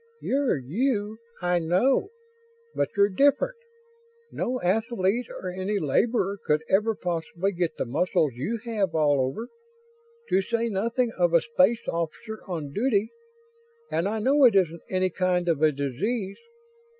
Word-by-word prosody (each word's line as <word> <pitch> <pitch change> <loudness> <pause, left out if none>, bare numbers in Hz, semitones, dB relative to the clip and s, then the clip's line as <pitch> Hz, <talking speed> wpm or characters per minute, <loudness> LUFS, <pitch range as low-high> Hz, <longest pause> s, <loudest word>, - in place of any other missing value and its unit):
"You're 275 - +1
you, 210 - -1 0.2
I 175 0 +2
know, 185 - +2 0.6
but - - 0
you're 200 0 +6
different. 285 - +2 0.7
No 255 +1 -2
athlete 220 +3 0
or 185 - -6
any 190 +3 -2
laborer 200 - +1
could 150 +1 +1
ever 215 +3 +2
possibly 175 +2 -2
get 175 -3 -2
the - - -1
muscles 155 +3 +1
you 145 - -3
have 205 -7 -1
all 145 -3 +3
over. 135 - -3 0.8
To 190 - +3
say 230 +3 -1
nothing 230 +4 0
of 175 -1 +3
a 170 - +6
space 230 0 +2
officer 170 +7 -4
on 155 -6 -5
duty. 220 -2 +1 0.8
And 170 - 0
I 220 - -2
know 275 +6 +3
it 230 -5 +5
isn't 170 -4 +2
any 185 0 0
kind 180 0 0
of 160 -3 +1
a 155 -1 +5
disease. 190 - -3
190 Hz, 145 wpm, -26 LUFS, 170-230 Hz, 0.8 s, you're